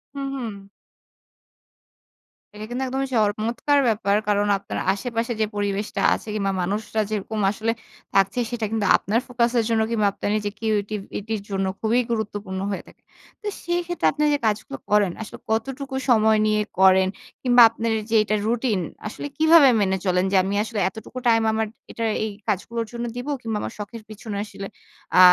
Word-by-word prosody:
হু, 280 - -4
হুম। 235 -6 -4 2.0
এটা 210 +1 -7
কিন্তু 250 +2 -2
একদমই 270 +1 -1
চমৎকার 225 +7 +2
ব্যাপার। 205 -2 +2
কারণ 205 0 +2
আপনার 195 - -5
আশেপাশে 230 +2 -2
যে 215 - +4
পরিবেশটা 205 0 -2
আছে - - -5
কিংবা 195 -2 0
মানুষরা 210 +4 -1
যেরকম 215 +1 -3
আসলে 225 +2 -1 0.4
থাকছে। 195 +4 +3
সেটা 230 -2 -2
কিন্তু 220 -2 0
আপনার 215 +4 0
ফোকাসের 240 -1 +1
জন্য 225 -1 +2
কিংবা 215 -3 +2
আপনার - - -3
নিজের 205 -1 -2
কিউরেটিভিটির 210 0 -2
জন্য 195 -1 -1
খুবই 230 +3 +2
গুরুত্বপূর্ণ 205 -4 -3
হয়ে 195 - -4
থাকে। - - -18 0.4
তো 420 - -6
সেই 345 0 0
ক্ষেত্রে 350 0 0
আপনি 300 +1 -1
যে 290 - +3
কাজগুলো 210 -10 -1
করেন, 205 -3 +4
আসলে 220 - -8
কতটুকু 265 +4 -2
সময় 220 -2 +5
নিয়ে 215 0 +2 0.2
করেন 190 0 +6 0.3
কিংবা 245 -1 +6
আপনার 230 0 -2 0.2
যে 230 - +3
এটা 215 0 0
রুটিন 230 -3 +1 0.3
আসলে 290 - -6
কিভাবে 315 -3 +7
মেনে 190 -1 +2
চলেন? 180 0 +2
যে - - +1
আমি 195 +1 -2
আসলে 220 -2 -4
এতটুকু 220 +4 -11
টাইম 225 -1 +5
আমার 220 0 0 0.2
এটা 230 - -4 0.2
এই 220 - -1 0.2
কাজগুলোর 225 +3 -1
জন্য 240 0 -4
দিব, 245 +3 -5
কিংবা 225 -3 -2
আমার - - -5
শখের 215 +2 -7
পেছনে 215 -1 -6
আসলে 195 -1 -8 0.5
আ - - +8
220 Hz, 165 wpm, -23 LUFS, 205-235 Hz, 2.0 s, আ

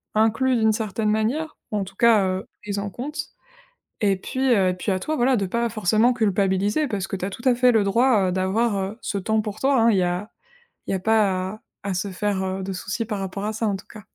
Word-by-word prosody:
inclus 225 +4 +3
d'une 220 -2 +3
certaine 215 -1 -1
manière, 245 +9 -1
ou 210 - 0
en 200 - 0
tout 195 0 -11
cas, 225 -2 +5
heu, 185 0 -2 0.2
prises 205 -1 -3
en 200 0 -3
comptent. 285 +9 -6 0.8
Et 200 -2 +3
puis, 195 +7 -6 0.2
heu, 190 -3 +3
et - - 0
puis 185 +3 -3
à 185 - -1
toi, 310 +10 -2
voilà, 255 +1 +3
de 200 -4 0
pas 235 +5 0
forcément 215 +3 +2
culpabiliser, 205 +4 +1
parce 205 -6 -2
que 195 - -3
tu 185 - -3
as - - -2
tout 200 - -9
à 255 - +5
fait 250 0 +4
le 220 -2 +4
droit, 215 0 +3
heu, - - -1
d'avoir, 200 +4 +1
heu, 195 +3 -3
ce 200 - -3
temps 220 +3 0
pour 210 -1 -6
toi, 270 0 +3
hein. 230 - +5
Il 200 - +2
y 185 - +3
a 180 +4 -2 0.6
il - - -2
y - - +1
a 190 - 0
pas 190 -2 +1
à 215 - -12 0.2
à 200 -2 -2
se 190 +2 -2
faire, 190 0 -1
heu, 190 0 -3
de 195 +1 -4
soucis 195 +5 -3
par 210 -1 -3
rapport 195 +1 -4
à 215 - -2
ça, 220 +1 -1
en 200 - 0
tout 190 - -10
cas. 215 - -11
210 Hz, 265 wpm, -23 LUFS, 190-225 Hz, 0.8 s, cas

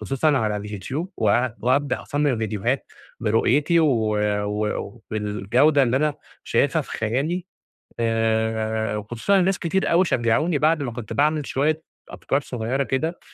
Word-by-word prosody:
خصوصًا 135 +7 +1
على 105 -3 0
اليوتيوب 105 - -5
و - - -2 0.4
وأبدأ 130 +2 +1
أصمم 145 -4 0
فيديوهات 110 +4 -2 0.3
برؤيتي 135 +9 +2
و 110 -8 +2 0.9
وبالجودة 110 +8 +2
اللي 125 0 +2
أنا 150 +1 +1 0.3
شايفها - - +1
في - - -14
خيالي، 145 - -1 0.5
آآ 110 -1 0
وخصوصًا 120 - 0
إن 180 - +3
ناس 195 -1 +1
كتير 190 +3 0
أوي 175 +2 +4
شجعوني، 145 +6 +1
بعد 155 0 +2
ما 120 - -3
كنت 115 -2 -7
باعمل 150 0 +1
شوية 155 +4 0 0.3
أفكار 140 - -1
صغيرة 125 +1 -2
كده، 160 +7 -2
130 Hz, 135 wpm, -23 LUFS, 110-155 Hz, 0.9 s, أوي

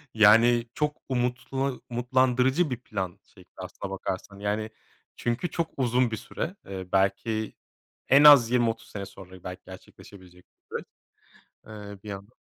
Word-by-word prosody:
Yani 115 +2 +6
çok 150 -1 -1
umutla 130 +2 -1 0.2
umutlandırıcı 130 +5 +2
1 125 - -2
plan 95 -7 -5 0.2
şey - - -16
aslına 95 - -7
bakarsan. 95 +1 -5
Yani 105 +2 -2 0.5
çünkü 120 +9 -2
çok 170 -1 -1
uzun 125 -2 +2
bir 110 - -2
süre, 180 - -5
eee, 95 -1 -7
belki 110 +3 0 0.5
en 140 +2 +7
az 140 -6 +9
20-30 115 -2 0
sene 100 -1 -6
sonra 95 -2 -13
belki 90 0 -7
gerçekleşebilecek 95 -1 -14
bir - - -15
süreç - - -9 0.8
,eee, 105 -2 -10
bir 105 - -8
yandan. 100 +3 -8
115 Hz, 140 wpm, -27 LUFS, 100-125 Hz, 0.8 s, az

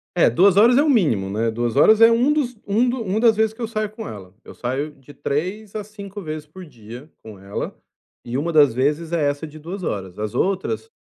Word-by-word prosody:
É, - - +5
2 185 - +4
horas 240 +4 +6
é 285 - +5
o 305 - +2
mínimo, 115 - +2
né, 115 +3 0
2 120 +1 -2
horas 220 +10 +5
é 230 - +9
um 245 +5 +3
dos 255 -5 -1
um 220 +5 +2
do 245 -1 -1
uma 200 +1 -1
das 225 -1 +4
vezes 220 0 +1
que 240 - -9
eu - - 0
saio 215 -1 -2
com 215 +1 -9
ela, 95 -3 -10
eu - - -12
saio 135 +5 -3
de 140 +1 -17
3 190 +9 -3
a 215 - -3
5 205 -1 -9
vezes 155 -3 -6
por 180 +3 -12
dia 120 +3 -12
com 110 -3 -11
ela 100 +1 -5 0.5
e 120 +2 -5
1 165 +4 -1
das 145 -6 +5
vezes 150 +5 0
é 160 -4 0
essa 145 +3 -5
de 155 +1 -12
2 180 +5 -7
horas, 95 - -4
as 105 +2 -4
outras 195 - -1
165 Hz, 240 wpm, -21 LUFS, -, 0.5 s, é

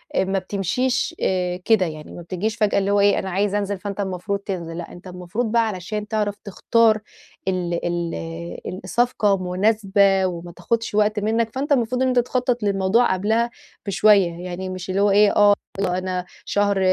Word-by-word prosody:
أ - - +3
ما 195 +1 0
بتمشيش 245 - -1
آآ، 180 -1 0
كده 220 -5 +4
يعني 155 -2 -7
ما - - -9
بتجيش 185 +5 -3
فجأة 210 -3 +1
اللي 200 0 0
هو 205 - +3
إيه 200 0 +4
أنا 190 - -4
عايز 200 +2 0
أنزِل 200 -1 -1
فأنت 200 +1 -6
المفروض 195 +1 -2
تنزِل، 175 -5 -5
لأ 175 - -7
أنت 175 +2 -12
المفروض 180 +6 -4
بقى 230 -1 +3
علشان 210 +1 -4
تعرف 210 -2 -1
تختار 220 +2 +2 0.5
ال 175 -2 -1
ال 90 - -4
الصفقة 225 -4 +1
مناسبة 200 -1 +3
وما 175 -1 -4
تاخُدش 225 +5 -2
وقت 210 0 +2
منّك 225 +2 0
فأنت 280 +3 -3
المفروض 250 -2 +2
إن 260 - +3
أنت 255 -1 +3
تخطط 250 -1 0
للموضوع 200 +3 +2
قبلها 220 +5 +1 0.4
بشويّة، 200 -3 +4
يعني 185 +1 -5
مش 185 0 -6
اللي 190 +2 +1
هو 205 0 +4
إيه 205 +1 +5
آه 205 0 +6 0.3
وأنا 185 -1 -1 0.2
شهر 205 -1 +1
200 Hz, 175 wpm, -22 LUFS, 185-220 Hz, 0.5 s, آه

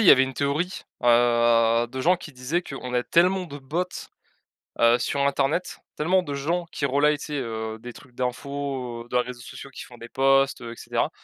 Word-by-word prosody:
il 220 - +3
y - - +10
avait 130 - +8
une 135 0 -1
théorie, 145 +7 -1 0.2
heu, 120 -1 +4
de 130 +2 -6
gens 180 +7 +4
qui 160 -3 -11
disaient 135 +7 -2
qu'on 125 -5 -6
a 125 - +2
tellement 180 +6 +3
de 145 -4 -8
bots, 150 +6 -2 1.0
heu, 115 +1 +6
sur 140 - -1
Internet, 140 +6 0 0.2
tellement 180 +5 +2
de 145 - -5
gens 165 +6 -1
qui 140 - -2
relaient, 145 +2 +3
tu - - -8
sais, 150 - -6
heu, 110 -3 -4
des 120 +2 -8
trucs 125 0 -16
d'infos, 130 -1 -3
heu, - - -21
de - - -4
réseaux 125 0 -2
sociaux 140 - -10
qui - - -9
font 120 - -14
des 115 0 -10
posts, 135 +1 +3
heu 120 -1 -6
et - - -8
cetera, - - -1
135 Hz, 215 wpm, -25 LUFS, 120-150 Hz, 1.0 s, y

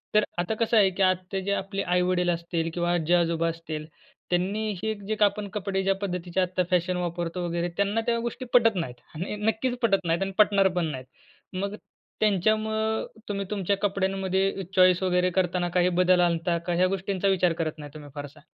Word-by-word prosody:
तर 215 - +6
आता 175 +5 0
कसं 230 0 +1
आहे 195 -2 +6
की, 190 +1 -5
आता 185 +1 +1
जे 200 +2 -3
आपले 195 0 -2
आई-वडील 180 0 +1
असतील 170 -1 -1
किंवा 175 0 0
आजी-आजोबा 170 0 +2
असतील, 160 -2 -6 0.4
त्यांनी 200 +5 0
हे 220 0 0
जे 215 - 0
का 210 - +4
आपण 205 0 -1
कपडे 195 -2 -2
ज्या 195 0 +2
पद्धतीचे 180 -2 -3
आत्ता 180 0 0
फॅशन 180 0 +1
वापरतो 175 0 -3
वगैरे, 170 +1 -1
त्यांना 200 +3 +1
त्या 235 0 +2
गोष्टी 240 +2 -4
पटत 230 -3 +5
नाहीत 130 -9 -3 0.2
आणि 180 +6 -4
नक्कीच 220 +4 -1
पटत 195 -5 +2
नाहीत 165 +2 +1
आणि 195 0 -1
पटणार 200 -2 +5
पण 170 - +2
नाहीत. 130 -2 -7 0.5
मग 200 +2 -3 0.4
त्यांच्यामूळं, 220 +2 +1 0.2
तुम्ही 200 -1 -2
तुमच्या 200 -1 0
कपड्यांमध्ये 195 -1 0
चॉईस 185 0 +5
वगैरे 180 0 +2
करताना 180 -1 0
काही 180 +1 +2
बदल 180 0 +4
आणता, 170 0 +1
का 170 +1 -3
ह्या 180 +2 +3
गोष्टींचा 195 0 -1
विचार 185 -3 +3
करत 160 -1 -3
नाही 145 -1 -8
तुम्ही 150 -2 -10
फारसा? 145 +1 -8
185 Hz, 185 wpm, -26 LUFS, 175-200 Hz, 0.5 s, तर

